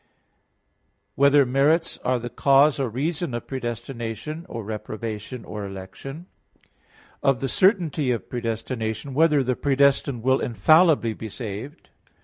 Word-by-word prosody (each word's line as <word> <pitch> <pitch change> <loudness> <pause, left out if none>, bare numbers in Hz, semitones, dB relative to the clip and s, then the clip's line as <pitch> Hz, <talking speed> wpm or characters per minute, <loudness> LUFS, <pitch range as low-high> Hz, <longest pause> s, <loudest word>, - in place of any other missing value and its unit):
(5) - - -41 1.1
Whether 140 +2 +5
merits 145 +6 +2
are 130 0 0
the 120 0 -6
cause 140 +1 +4
or 135 -3 0
reason 150 - -2
of 120 - -5
predestination, 120 +4 -5
or 115 - -5
reprobation, 110 +2 -6
or 105 -1 -6
election? 100 - -8 0.4
(6) - - -33 0.5
of 135 -3 +2
the 135 - -2
certainty 170 - +2
of 120 - -3
predestination; 115 +1 -4
whether 150 -1 +4
the 125 0 0
predestined 140 -3 +2
will 130 +1 +3
infallibly 155 0 +4
be 110 0 -7
saved? 115 - -7
130 Hz, 130 wpm, -24 LUFS, 115-145 Hz, 1.1 s, Whether